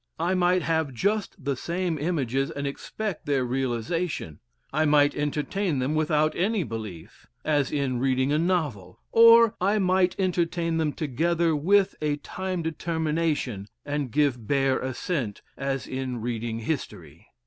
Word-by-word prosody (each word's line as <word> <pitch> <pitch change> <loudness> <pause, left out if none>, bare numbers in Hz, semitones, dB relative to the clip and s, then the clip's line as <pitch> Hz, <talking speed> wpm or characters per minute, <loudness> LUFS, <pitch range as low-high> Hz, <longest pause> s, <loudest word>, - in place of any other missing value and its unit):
I 170 +3 0
might 180 0 +2
have 160 -5 0
just 200 - -1
the 140 -1 0
same 170 +3 -2
images 135 -5 0
and 140 0 -4
expect 185 +7 -4
their 135 -3 +1
realization; 130 - -2 0.3
I 155 +2 +2
might 145 -1 +4
entertain 150 +4 -1
them 130 +3 0
without 155 0 +2
any 200 +2 +1
belief, 105 - -8 0.2
as 145 -3 +1
in 135 -4 -1
reading 130 +1 +1
a 150 - +2
novel; 150 - -1
or 230 -1 +7
I 200 +3 +3
might 185 -2 +2
entertain 170 -2 0
them 155 -2 +1
together 165 +3 0
with 190 +6 +3
a 150 -1 +1
time 185 +3 -4
determination, 160 - -1 0.2
and 145 -2 -2
give 130 -4 +1
bare 135 -2 +2
assent, 130 - -3
as 135 -1 -2
in 130 -2 -4
reading 115 0 -3
history. 145 +6 -5
150 Hz, 140 wpm, -26 LUFS, 130-175 Hz, 0.3 s, or